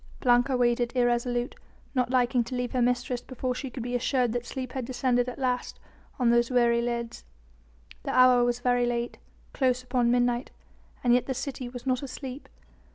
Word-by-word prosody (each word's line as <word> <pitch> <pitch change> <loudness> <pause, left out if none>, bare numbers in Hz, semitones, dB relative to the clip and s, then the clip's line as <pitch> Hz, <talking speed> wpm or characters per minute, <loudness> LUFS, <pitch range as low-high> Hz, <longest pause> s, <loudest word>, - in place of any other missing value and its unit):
Blanca 245 +1 +3
waited 240 -1 +1
irresolute, 240 0 +1 0.4
not 250 -3 +1
liking 250 -1 +2
to 250 - -5
leave 245 0 -2
her 255 - 0
mistress 245 0 0
before 255 0 -3
she 265 +2 -5
could 250 -1 -6
be 245 +1 -4
assured 245 0 +1
that 240 0 -3
sleep 255 -2 -5
had 260 0 -3
descended 245 0 0
at 250 - -8
last 250 -2 -2 0.4
on 245 -2 +3
those 235 0 +3
weary 235 -2 +3
lids. 235 -1 -3 0.8
The - - -6
hour 255 -1 +6
was 240 0 0
very 245 -1 +2
late, 240 0 -2 0.3
close 255 -2 +1
upon 245 -1 +1
midnight, 245 0 +1 0.5
and 240 -1 +4
yet 245 0 +2
the 265 - -2
city 260 -1 -5
was 245 0 -9
not 255 -1 +1
asleep. 265 0 -7
245 Hz, 180 wpm, -27 LUFS, 240-255 Hz, 0.8 s, hour